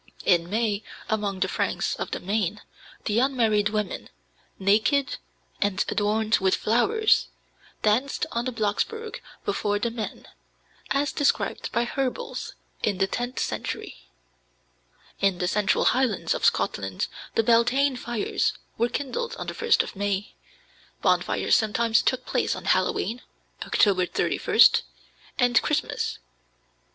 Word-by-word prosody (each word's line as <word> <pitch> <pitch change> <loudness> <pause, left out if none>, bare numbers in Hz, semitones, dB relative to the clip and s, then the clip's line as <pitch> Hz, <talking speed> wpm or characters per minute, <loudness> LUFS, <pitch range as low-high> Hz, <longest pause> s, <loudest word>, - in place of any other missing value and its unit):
In 175 -2 +3
May, 215 -1 0 0.3
among 205 -3 -1
the - - +3
Franks - - -1
of - - -4
the - - -3
Main, 205 +1 -1 0.4
the 210 +2 +2
unmarried 225 -5 +2
women, 210 -3 -3 0.5
naked 220 +8 +2 0.4
and 200 -1 +1
adorned 215 +2 +1
with 190 -1 +3
flowers, 420 - +2 0.6
danced 235 +6 +1
on 235 +1 -2
the 255 - -1
Blocksberg 240 - -2 0.2
before 205 0 0
the 230 +3 -1
men, 225 -2 -6 0.6
as 285 +2 +1
described 290 -1 0
by 235 - +1
Herbels 260 +1 -3 0.3
in 205 -3 0
the 195 - +3
tenth 245 +5 -4
century. - - -4 1.1
In 195 -2 +2
the 180 - -1
central 200 +1 +2
highlands 255 -6 +1
of - - -1
Scotland 95 -1 0 0.3
the 225 - +3
Beltane 245 +4 +3
fires 240 -3 -1 0.3
were 235 +1 +2
kindled 380 - -3
on - - -6
the - - -4
1st 465 0 +3
of - - -9
May. 200 0 -2 0.7
Bonfires - - +2
sometimes 225 +1 +2
took - - 0
place - - 0
on - - -8
Halloween 405 - +1 0.4
(October 185 -3 +3
31st) - - +4 0.6
and 245 -2 +4
Christmas. 300 +1 -1
220 Hz, 125 wpm, -25 LUFS, 205-250 Hz, 1.1 s, 31st